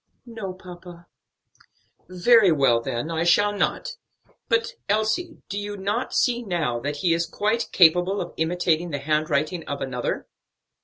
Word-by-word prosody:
"No, 225 Hz, -5 st, -6 dB
papa." 175 Hz, -1 st, -12 dB, 1.0 s
"Very 195 Hz, +2 st, +5 dB
well, 135 Hz, -6 st, +3 dB
then 120 Hz, +7 st, -4 dB
I 165 Hz, 0 st, -1 dB
shall 205 Hz, +4 st, +3 dB
not. 485 Hz, -, -2 dB, 0.5 s
But, -, -, +1 dB, 0.2 s
Elsie, 220 Hz, -, -1 dB
do 200 Hz, -, -4 dB
you 205 Hz, 0 st, -5 dB
not 205 Hz, +6 st, -2 dB
see 240 Hz, -1 st, +2 dB
now 170 Hz, -, -2 dB
that 145 Hz, +4 st, -3 dB
he 170 Hz, -, +4 dB
is 170 Hz, 0 st, 0 dB
quite 215 Hz, +6 st, -1 dB
capable 180 Hz, +3 st, +4 dB
of 175 Hz, -, -5 dB
imitating 170 Hz, 0 st, 0 dB
the 145 Hz, -, -3 dB
handwriting 155 Hz, +3 st, -1 dB
of 140 Hz, -, -4 dB
another?" 130 Hz, -2 st, -3 dB
180 Hz, 145 wpm, -24 LUFS, 160-205 Hz, 1.0 s, Very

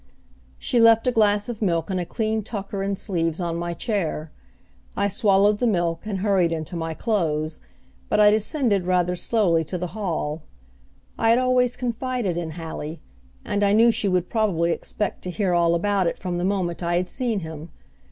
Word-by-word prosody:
She 245 Hz, -, 0 dB
left 230 Hz, -1 st, +6 dB
a 250 Hz, -, +3 dB
glass 210 Hz, -3 st, +2 dB
of 235 Hz, -3 st, -6 dB
milk 170 Hz, -3 st, 0 dB
and 185 Hz, -, 0 dB
a 175 Hz, -, -3 dB
clean 220 Hz, -1 st, -1 dB
tucker 200 Hz, -2 st, -5 dB
and 195 Hz, 0 st, -1 dB
sleeves 165 Hz, -5 st, -2 dB
on 170 Hz, -2 st, -2 dB
my 170 Hz, 0 st, -3 dB
chair. 165 Hz, -8 st, -2 dB, 0.7 s
I 200 Hz, -, +2 dB
swallowed 205 Hz, 0 st, +3 dB
the 245 Hz, -, +2 dB
milk, 175 Hz, -2 st, 0 dB
and 195 Hz, -3 st, -3 dB
hurried 190 Hz, -5 st, +2 dB
into 165 Hz, +2 st, -4 dB
my 165 Hz, -1 st, -3 dB
clothes, 155 Hz, -8 st, -1 dB, 0.5 s
but -, -, +2 dB
I 210 Hz, 0 st, +7 dB
descended 215 Hz, -, +1 dB
rather 180 Hz, -1 st, +2 dB
slowly 175 Hz, -4 st, +1 dB
to 180 Hz, -, -4 dB
the 180 Hz, 0 st, -5 dB
hall. 165 Hz, -7 st, -3 dB, 0.8 s
I 225 Hz, -, +3 dB
had 230 Hz, -, +5 dB
always 250 Hz, -1 st, +2 dB
confided 245 Hz, -5 st, -2 dB
in 165 Hz, -2 st, -4 dB
Hallie, 160 Hz, -1 st, -6 dB, 0.5 s
and 205 Hz, -, 0 dB
I 200 Hz, 0 st, +3 dB
knew 230 Hz, +2 st, +6 dB
she 210 Hz, -, -1 dB
would 180 Hz, -2 st, +1 dB
probably 190 Hz, -7 st, +1 dB
expect 205 Hz, +4 st, -3 dB
to 180 Hz, -, -5 dB
hear 185 Hz, 0 st, 0 dB
all 170 Hz, -1 st, +3 dB
about 195 Hz, +1 st, +1 dB
it -, -, -2 dB
from 180 Hz, -2 st, -3 dB
the 175 Hz, -, -1 dB
moment 185 Hz, -3 st, -1 dB
I 170 Hz, 0 st, 0 dB
had 180 Hz, +1 st, 0 dB
seen 235 Hz, -4 st, -2 dB
him. 160 Hz, 0 st, -8 dB
190 Hz, 190 wpm, -23 LUFS, 170-215 Hz, 0.8 s, I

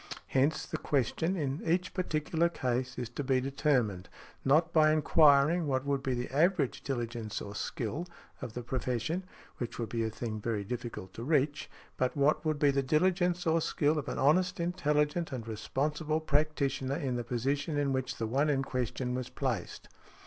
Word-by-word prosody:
Hence, 140 Hz, +4 st, +2 dB
the -, -, -4 dB
question, 150 Hz, -, 0 dB
in 145 Hz, -4 st, -2 dB
each 175 Hz, +2 st, 0 dB
particular 170 Hz, -2 st, 0 dB
case, 130 Hz, -4 st, -2 dB
is 125 Hz, -2 st, -3 dB
to 145 Hz, -, -4 dB
be 130 Hz, -1 st, +2 dB
determined, 130 Hz, -, 0 dB, 0.3 s
not 160 Hz, +5 st, +3 dB
by 155 Hz, -1 st, +6 dB
enquiring 155 Hz, +1 st, +5 dB
what 130 Hz, -1 st, 0 dB
would 140 Hz, -1 st, 0 dB
be 130 Hz, -2 st, -1 dB
the 125 Hz, 0 st, -2 dB
average 160 Hz, -3 st, +2 dB
diligence 120 Hz, -4 st, -3 dB
or 100 Hz, -, -7 dB
skill 125 Hz, -, -3 dB, 0.3 s
of 110 Hz, -, -6 dB
the 125 Hz, -, -5 dB
profession 130 Hz, +8 st, -2 dB, 0.3 s
(which 120 Hz, -1 st, -4 dB
would 115 Hz, -3 st, -3 dB
be 115 Hz, +1 st, -1 dB
a 110 Hz, -, 0 dB
thing 110 Hz, -1 st, -5 dB
very 110 Hz, -2 st, -1 dB
difficult 115 Hz, -4 st, -6 dB
to 115 Hz, -, -7 dB
reach), 145 Hz, +1 st, +1 dB, 0.3 s
but 130 Hz, +3 st, 0 dB
what 140 Hz, +2 st, +3 dB
would 155 Hz, -2 st, 0 dB
be 145 Hz, -1 st, +4 dB
the 140 Hz, 0 st, +1 dB
diligence 175 Hz, +5 st, +2 dB
or 165 Hz, 0 st, +3 dB
skill 150 Hz, 0 st, +1 dB
of 145 Hz, -, -6 dB
an -, -, -3 dB
honest, 180 Hz, +6 st, +3 dB
intelligent 165 Hz, -2 st, 0 dB
and 120 Hz, -4 st, -5 dB
responsible 150 Hz, +8 st, -1 dB
practitioner 140 Hz, -3 st, 0 dB
in 130 Hz, -4 st, -2 dB
the 120 Hz, -, -2 dB
position 135 Hz, +6 st, -1 dB
in 140 Hz, -2 st, +1 dB
which 130 Hz, -1 st, -2 dB
the 115 Hz, -, -2 dB
one 135 Hz, +7 st, +1 dB
in 135 Hz, -2 st, +1 dB
question 125 Hz, -1 st, -2 dB
was 125 Hz, -1 st, -3 dB
placed. 125 Hz, -10 st, -3 dB
140 Hz, 180 wpm, -31 LUFS, 125-155 Hz, 0.3 s, by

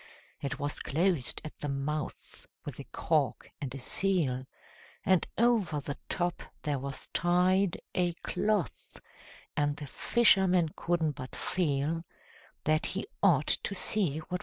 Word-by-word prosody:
It 135 Hz, -1 st, -2 dB
was 145 Hz, +1 st, -2 dB
closed 160 Hz, -4 st, +1 dB
at 155 Hz, -, -9 dB
the 145 Hz, -, -3 dB
mouth 140 Hz, +2 st, -4 dB, 0.2 s
with -, -, -6 dB
a -, -, -6 dB
cork -, -, 0 dB
and 135 Hz, -3 st, -3 dB
a -, -, -5 dB
seal, 135 Hz, -4 st, +2 dB, 0.6 s
And 185 Hz, -2 st, +4 dB
over 220 Hz, -10 st, +3 dB
the 140 Hz, 0 st, -4 dB
top 175 Hz, -1 st, 0 dB, 0.2 s
there 145 Hz, -2 st, 0 dB
was 135 Hz, +1 st, -5 dB
tied 180 Hz, +2 st, +3 dB
A 175 Hz, -1 st, +1 dB
cloth, 210 Hz, -5 st, -1 dB, 0.6 s
and 145 Hz, -1 st, +1 dB
the 145 Hz, -, -6 dB
fisherman 185 Hz, -, +4 dB
couldn't 165 Hz, -3 st, +1 dB
but 130 Hz, -2 st, -8 dB
feel 160 Hz, -1 st, 0 dB, 0.6 s
That 155 Hz, +1 st, +2 dB
he 195 Hz, -, -2 dB, 0.2 s
ought 155 Hz, -8 st, +5 dB, 0.2 s
to 200 Hz, -, -3 dB
see 185 Hz, -6 st, +1 dB
what 160 Hz, -, -9 dB
was 180 Hz, -, +1 dB
inside. -, -, -21 dB
160 Hz, 145 wpm, -31 LUFS, 145-185 Hz, 0.6 s, ought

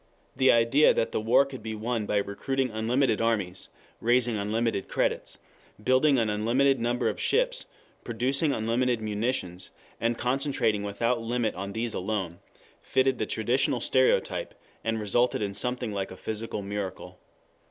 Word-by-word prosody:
The 130 Hz, 0 st, +5 dB
idea 115 Hz, +6 st, +4 dB
that -, -, 0 dB
the -, -, -1 dB
war 115 Hz, +5 st, +4 dB
could 135 Hz, -3 st, -9 dB
be 110 Hz, 0 st, -5 dB
won 110 Hz, 0 st, -2 dB
by 105 Hz, -, +1 dB
recruiting 130 Hz, +6 st, -1 dB
unlimited 115 Hz, +2 st, +1 dB
armies, 100 Hz, -5 st, -1 dB, 0.3 s
raising 120 Hz, 0 st, +2 dB
unlimited 105 Hz, 0 st, -1 dB
credits, -, -, -1 dB, 0.5 s
building 130 Hz, +3 st, +4 dB
an 115 Hz, -2 st, +2 dB
unlimited 120 Hz, +6 st, +2 dB
number 120 Hz, +2 st, 0 dB
of -, -, -2 dB
ships, -, -, +1 dB, 0.4 s
producing 130 Hz, +6 st, 0 dB
unlimited 120 Hz, +1 st, 0 dB
munitions, 105 Hz, -4 st, -3 dB, 0.3 s
and 115 Hz, 0 st, 0 dB
concentrating 125 Hz, -4 st, 0 dB
without 115 Hz, +4 st, -1 dB
limit 115 Hz, -1 st, -1 dB
on 100 Hz, +2 st, -6 dB
these 115 Hz, +1 st, -2 dB
alone, 95 Hz, -3 st, -3 dB, 0.4 s
fitted 130 Hz, -1 st, +1 dB
the 110 Hz, -, -1 dB
traditional 120 Hz, +3 st, +1 dB
stereotype, 130 Hz, +2 st, +1 dB, 0.3 s
and 115 Hz, 0 st, -1 dB
resulted 110 Hz, +2 st, +1 dB
in 100 Hz, -1 st, -3 dB
something 125 Hz, +3 st, -2 dB
like 95 Hz, -1 st, -3 dB
a 95 Hz, -, -10 dB
physical 110 Hz, 0 st, -4 dB
miracle. 100 Hz, -1 st, -5 dB
115 Hz, 145 wpm, -27 LUFS, 105-125 Hz, 0.5 s, The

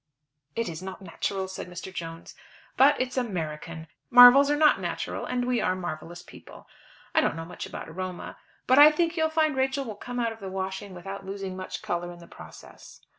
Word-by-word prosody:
"It 230 Hz, -2 st, -1 dB
is 165 Hz, -1 st, -6 dB
not 190 Hz, +1 st, -8 dB
natural," 190 Hz, +2 st, -3 dB
said 190 Hz, -, -7 dB
Mr. 180 Hz, +1 st, -8 dB
Jones. 165 Hz, -2 st, -7 dB, 0.4 s
"But 275 Hz, +3 st, +5 dB
it's 255 Hz, +1 st, -2 dB
American. 165 Hz, -7 st, -4 dB, 0.2 s
Marvels 245 Hz, +3 st, +9 dB
are 295 Hz, -, +3 dB
not 300 Hz, 0 st, +4 dB
natural, -, -, -4 dB
and 245 Hz, -1 st, -1 dB
we 250 Hz, -1 st, 0 dB
are 185 Hz, -, +1 dB
marvellous 175 Hz, -1 st, -6 dB
people. -, -, -14 dB, 0.5 s
I -, -, +4 dB
don't -, -, 0 dB
know 165 Hz, 0 st, -6 dB
much 175 Hz, -, -7 dB
about -, -, -8 dB
aroma, 185 Hz, +2 st, -7 dB, 0.3 s
but 260 Hz, +2 st, +5 dB
I 295 Hz, +1 st, +11 dB
think 330 Hz, +2 st, 0 dB
you'll 320 Hz, -2 st, +1 dB
find 315 Hz, -2 st, +1 dB
Rachel 265 Hz, +1 st, 0 dB
will 220 Hz, -, -5 dB
come 245 Hz, +4 st, -6 dB
out 230 Hz, -1 st, 0 dB
of 225 Hz, -, -16 dB
the 195 Hz, -2 st, -6 dB
washing 190 Hz, +1 st, -5 dB
without 195 Hz, +3 st, -7 dB
losing 195 Hz, -1 st, -6 dB
much 185 Hz, 0 st, -6 dB
colour 175 Hz, 0 st, -3 dB
in 175 Hz, -, -11 dB
the 170 Hz, -, -13 dB
process." -, -, -14 dB
195 Hz, 200 wpm, -27 LUFS, 175-255 Hz, 0.5 s, I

